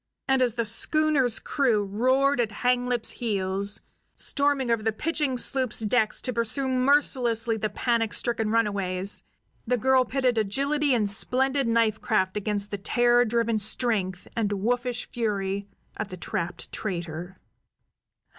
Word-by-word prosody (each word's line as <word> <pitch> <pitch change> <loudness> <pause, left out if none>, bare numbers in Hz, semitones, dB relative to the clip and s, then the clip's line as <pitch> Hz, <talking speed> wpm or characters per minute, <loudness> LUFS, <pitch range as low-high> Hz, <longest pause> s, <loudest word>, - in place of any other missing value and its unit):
And 265 -1 +2
as 245 -3 +1
the 235 -2 -1
schooner's 270 +2 +2
crew 240 -8 +1
roared 255 +7 +1
at 225 -2 -2
Hanglip's 245 -2 +1
heels, 200 -2 -1 0.3
storming 280 -4 +1
over 230 - +3
to - - -11
the 220 - +2
pitching 295 +2 -1
sloop's 255 -2 +1
decks 220 0 +1
to 250 - -2
pursue 235 +4 -2
mercilessly 255 -4 +2
the 215 0 -2
panic 230 -2 0
stricken 225 -2 -1
runaways, 200 -4 0 0.5
the 250 +1 +2
girl 260 +2 +3
pitted 255 -3 0
agility 275 +6 +1
and 215 -3 +1
splendid 265 +6 +1
knife 230 -2 +1
craft 190 -4 0
against 205 0 -2
the 205 - -4
terror 240 +4 +3
driven 230 -1 0
strength 205 -4 -1
and 220 -3 0
wolfish 245 +4 -1
fury 200 -3 -2 0.3
of 215 - -3
the 185 - -9
trapped 170 0 -4
traitor. 175 -2 -5
230 Hz, 140 wpm, -26 LUFS, 205-255 Hz, 0.5 s, over